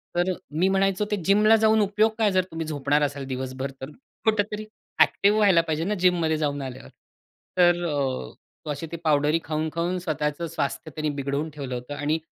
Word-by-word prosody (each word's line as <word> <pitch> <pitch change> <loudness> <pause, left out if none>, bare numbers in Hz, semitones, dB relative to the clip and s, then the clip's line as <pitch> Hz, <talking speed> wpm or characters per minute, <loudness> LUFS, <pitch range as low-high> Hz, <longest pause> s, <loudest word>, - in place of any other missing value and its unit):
तर 175 +2 +2
अ, - - -2 0.2
मी 170 +5 +2
म्हणायचो 195 +1 +1
ते 210 - +3
जिमला 210 +3 +5
जाऊन 220 0 +4
उपयोग 210 +2 +2
काय 215 -3 +3
जर 185 -1 +3
तुम्ही 165 0 -4
झोपणार 145 0 +1
असाल 140 -1 -2
दिवसभर 130 +1 -4
तर? 135 - -6 0.3
कुठेतरी 215 -1 0 0.3
अ‍ॅक्टिव्ह 205 +2 +4
व्हायला 195 -5 +5
पाहिजे 160 -1 -2
ना, 205 +4 -1
जिम 180 -1 +3
मध्ये 160 -1 +1
जाऊन 145 -2 -1
आल्यावर. 130 -1 -8 0.7
तर 175 -1 +4
अ, 140 -4 -2 0.3
तो - - -6
अशी 145 +3 -5
ती 170 - -4
पावडरी 150 +1 +3
खाऊन-खाऊन 160 +3 -2
स्वतःच 150 -2 -2
स्वास्थ्य 155 +1 -3
बिघडवून 140 +2 -2
ठेवलं 140 -4 -5
होतं 125 +4 -6
आणि 150 +2 0
160 Hz, 180 wpm, -25 LUFS, 145-190 Hz, 0.7 s, जिमला